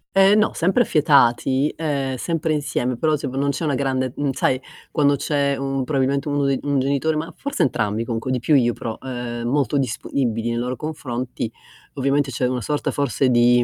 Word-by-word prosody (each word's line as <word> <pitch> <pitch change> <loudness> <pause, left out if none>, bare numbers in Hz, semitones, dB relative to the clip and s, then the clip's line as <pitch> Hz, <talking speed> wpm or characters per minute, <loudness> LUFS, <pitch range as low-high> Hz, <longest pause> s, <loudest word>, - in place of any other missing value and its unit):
Ehm, 195 +2 +6
no, 215 - +2
sempre 190 +8 +2
affiatati, 140 - +3
ehm, 140 -4 -1
sempre 160 +4 -1
insieme, 140 -4 -1
però 155 +3 +2
se 140 -1 -4
v 130 - -6
non 140 +1 +1
c'è 165 - -4
una 145 -3 +1
grande 130 -1 -1
mhmm, 145 -2 0
sai 130 0 +1 0.3
quando 145 -2 +3
c'è 140 0 0
un 135 0 -2
probabilmente 140 +1 0
1 145 -1 +1
dei 135 -1 +1
un 140 -1 +1
genitore 140 +4 +1
ma 155 +2 -3
forse 280 0 -3
entrambi 110 -3 0
comunque, 115 +2 -3
di 125 - 0
più 145 +6 +2
io, 120 -3 +3
però, 110 -1 -5
ehm, 120 -2 -5
molto 145 +2 +1
disponibili 120 -2 -1
nei 115 - -1
loro 125 +2 -2
confronti, 125 -6 -4 0.4
ovviamente 140 0 0
c'è 125 +1 0
una 125 0 -2
sorta 150 +4 -1
forse 135 -1 +1
di 120 0 +5
135 Hz, 195 wpm, -22 LUFS, 125-145 Hz, 0.4 s, Ehm